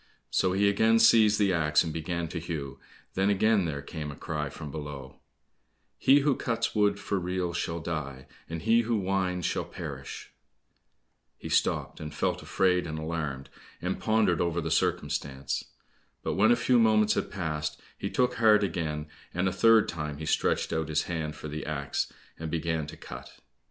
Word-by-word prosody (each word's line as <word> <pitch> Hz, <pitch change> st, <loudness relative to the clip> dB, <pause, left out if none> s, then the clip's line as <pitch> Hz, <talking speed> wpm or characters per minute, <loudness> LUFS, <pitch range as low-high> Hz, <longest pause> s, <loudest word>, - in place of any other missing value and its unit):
So 90 Hz, -1 st, +2 dB
he 100 Hz, +2 st, +3 dB
again 110 Hz, +3 st, +4 dB
seized 110 Hz, -2 st, +6 dB
the 100 Hz, -3 st, +3 dB
axe, 75 Hz, -3 st, +3 dB
and 80 Hz, -2 st, -4 dB
began 85 Hz, +1 st, -3 dB
to 85 Hz, -, -4 dB
hew, 80 Hz, -5 st, -5 dB, 0.3 s
then 95 Hz, +1 st, +2 dB
again 105 Hz, -1 st, +3 dB
there 70 Hz, -3 st, -3 dB
came 75 Hz, 0 st, -6 dB
a 70 Hz, -, -7 dB
cry 75 Hz, -2 st, -3 dB
from 75 Hz, +1 st, -8 dB
below: 70 Hz, -3 st, -7 dB, 0.8 s
"He 140 Hz, +2 st, +6 dB
who 140 Hz, -1 st, +2 dB
cuts 115 Hz, -2 st, -1 dB
wood 105 Hz, -1 st, +2 dB
for 100 Hz, -1 st, -1 dB
reels 90 Hz, -1 st, -2 dB
shall 85 Hz, 0 st, -2 dB
die, 70 Hz, -6 st, -4 dB, 0.2 s
And 80 Hz, 0 st, -5 dB
he 115 Hz, +2 st, +4 dB
who 115 Hz, 0 st, 0 dB
winds, 95 Hz, -3 st, -1 dB
shall -, -, 0 dB
perish." -, -, -8 dB, 1.1 s
He -, -, -8 dB
stopped, -, -, +1 dB
and 75 Hz, -1 st, -6 dB
felt -, -, -1 dB
afraid 90 Hz, -2 st, +1 dB
and 80 Hz, 0 st, -4 dB
alarmed, 80 Hz, -4 st, -4 dB, 0.3 s
and 90 Hz, +2 st, -2 dB
pondered 110 Hz, -7 st, +2 dB
over 85 Hz, -1 st, 0 dB
the 80 Hz, -1 st, -3 dB
circumstance. 75 Hz, -6 st, -1 dB, 0.6 s
But -, -, -1 dB
when 105 Hz, +3 st, +4 dB
a -, -, +6 dB
few 120 Hz, +1 st, +3 dB
moments 110 Hz, -2 st, +4 dB
had -, -, -1 dB
passed, 75 Hz, -5 st, -3 dB, 0.2 s
he -, -, -4 dB
took 125 Hz, -1 st, +1 dB
heart 110 Hz, -2 st, +5 dB
again, 80 Hz, -5 st, -2 dB, 0.3 s
and 90 Hz, +2 st, +1 dB
a -, -, +1 dB
third 115 Hz, +3 st, +5 dB
time 75 Hz, -3 st, -4 dB
he 80 Hz, -, -6 dB
stretched 80 Hz, -, +1 dB
out 80 Hz, -1 st, -1 dB
his 75 Hz, 0 st, +1 dB
hand 80 Hz, -3 st, -3 dB
for 75 Hz, -, -7 dB
the 75 Hz, +1 st, -5 dB
axe, 70 Hz, -2 st, -2 dB, 0.3 s
and 80 Hz, 0 st, -4 dB
began 80 Hz, -1 st, -1 dB
to -, -, -9 dB
cut. -, -, -10 dB
85 Hz, 180 wpm, -28 LUFS, 75-100 Hz, 1.1 s, seized